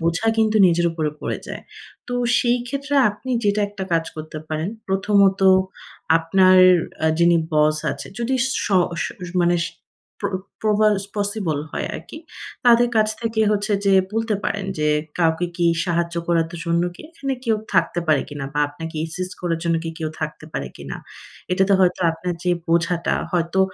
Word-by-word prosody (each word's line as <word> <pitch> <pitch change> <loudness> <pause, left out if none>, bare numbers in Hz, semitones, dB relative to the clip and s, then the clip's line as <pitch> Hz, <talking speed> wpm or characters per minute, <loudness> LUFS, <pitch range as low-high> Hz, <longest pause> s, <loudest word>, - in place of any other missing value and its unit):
বোঝা 170 +6 0
কিন্তু 220 -1 +3
নিজের 170 0 +2
উপরে 155 -2 -1
পড়ে - - -3
যায়। - - -7 0.5
তো 245 - -3 0.2
সেই 245 0 +2
ক্ষেত্রে 280 +3 -3 0.2
আপনি 235 +5 -8
যেটা 205 +1 +2
একটা 200 -2 -6
কাজ 165 -1 +2
করতে 155 0 -7
পারেন, 155 +3 -2 0.2
প্রথমত 195 0 +3 0.8
আপনার 185 +3 +4 0.5
আ - - +4
যিনি 170 0 +5 0.2
বস 155 0 +3 0.2
আছে - - -8
যদি 240 +3 -1 0.3
শ - - -2 0.4
শ - - -2 0.4
মানে 175 0 +3
সে - - -5 0.5
প্র 200 -1 -1 0.3
প্রবালস 210 -2 +2
পসিবল 205 -7 -1
হয় - - -3
আরকি। 175 - -8 0.5
তাদের 240 0 +6
কাছ 215 0 +4
থেকে 225 -1 -1
হচ্ছে 210 0 0
যে 195 - +5 0.2
বলতে 225 -1 0
পারেন 200 -2 -2
যে 150 0 +1 0.3
কাউকে 165 +1 +2
কি 175 - +2 0.2
সাহায্য 170 -1 -1
করাতে 165 0 +1
জন্যকে 175 +1 -1
এখানে 275 -5 -4
কেউ 225 -3 +2 0.2
থাকতে 175 - +2
পারে 155 -2 +3
কিনা? 145 -1 -6
বা 150 - +1
আপনাকে 160 +2 -8
অ্যাসিস্ট 180 +3 -4
করার 170 -2 -1
জন্য 165 -1 +2
কি 165 - -3
কেউ 160 -1 -2
থাকতে 155 0 -5
পারে - - -3
কিনা? - - -7 0.6
এটাতে 190 +2 +2
হয়তো 180 0 +2
আপনার 175 +2 -4
যে 180 - +2 0.2
বোঝাটা 170 0 +1 0.2
হয়তো 175 +1 +1
180 Hz, 165 wpm, -21 LUFS, 165-210 Hz, 0.8 s, তাদের